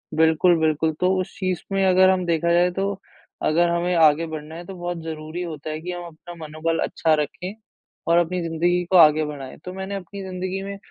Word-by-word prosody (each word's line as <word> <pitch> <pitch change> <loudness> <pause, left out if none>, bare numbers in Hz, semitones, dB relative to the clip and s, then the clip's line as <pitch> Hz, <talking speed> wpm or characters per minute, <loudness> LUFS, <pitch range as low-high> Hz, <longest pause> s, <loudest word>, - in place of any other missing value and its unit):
बिल्कुल, 160 +2 +4
बिल्कुल। 160 0 +1
तो 185 +1 +2
उस 185 - -8
चीज़ 185 -3 -1
में 195 0 +2
अगर 185 0 +5
हम 185 -1 +1
देखा 170 0 +1
जाए 175 +1 +4
तो 195 +2 -2 0.5
अगर 170 +3 +3
हमें 175 +1 0
आगे 160 0 +5
बढ़ना 155 0 -7
है 175 +1 -8
तो 195 - -8
बहुत 175 -1 -4
ज़रूरी 160 +1 -6
होता 155 -3 -6
है 155 0 -4
कि 180 +2 -5
हम 175 0 -6
अपना 170 +1 -11
मनोबल 160 0 -3
अच्छा 160 - +1
रखें 155 +5 -4 0.5
और 170 +1 +4
अपनी 175 +1 +1
ज़िंदगी 175 +2 +1
को 185 - +6
आगे 155 -2 +6
बढ़ाएँ। 140 -3 -7
तो 180 - -6
मैंने 190 +1 -5
अपनी 195 +1 -7
ज़िंदगी 185 0 -4
में 200 0 -6
170 Hz, 210 wpm, -23 LUFS, 160-185 Hz, 0.5 s, को